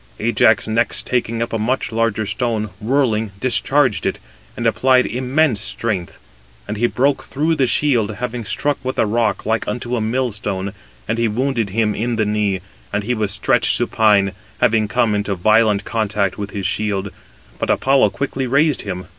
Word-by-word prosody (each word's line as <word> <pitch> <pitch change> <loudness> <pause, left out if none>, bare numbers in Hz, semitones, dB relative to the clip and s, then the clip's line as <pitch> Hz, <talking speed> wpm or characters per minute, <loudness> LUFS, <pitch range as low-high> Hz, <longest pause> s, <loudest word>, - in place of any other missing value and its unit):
Ajax - - +3
next 115 +2 0
taking 115 -2 -1
up 115 - -6
a 115 - 0
much 125 +5 -1
larger 115 -1 0
stone, 110 -2 -2
whirling, 115 -3 +1
discharged 130 0 +2
it, - - -1 0.4
and - - -3
applied 130 -1 +3
immense 130 -1 +1
strength. 105 -5 -3 0.5
And 105 - -3
he 120 +3 +2
broke 135 +3 0
through 155 +4 0
the 135 -5 +2
shield, 120 -7 +1
having 125 0 -4
struck 145 +6 -1
with 130 +1 -3
a - - +3
rock 110 +1 0
like 110 0 0
unto 120 +3 -2
a 115 - -1
millstone, 105 -5 -2 0.3
and 115 - -1
he 115 - +2
wounded 120 -1 -1
him 105 +1 +1
in 115 +3 -2
the 110 -1 +1
knee; 105 -3 0 0.3
and 105 0 -1
he 125 +4 -1
was 105 -4 -1
stretched - - +2
supine, 105 -3 +3 0.3
having 110 -1 +3
come 115 -1 +1
into 105 -1 -1
violent 105 +2 +3
contact 105 -3 -1
with 100 -1 -5
his 100 -2 -5
shield; 100 0 -1 0.5
but - - -2
Apollo 135 -5 +3
quickly 130 +5 -3
raised 145 +3 +2
him. 90 -3 -5
110 Hz, 170 wpm, -19 LUFS, 105-125 Hz, 0.5 s, Ajax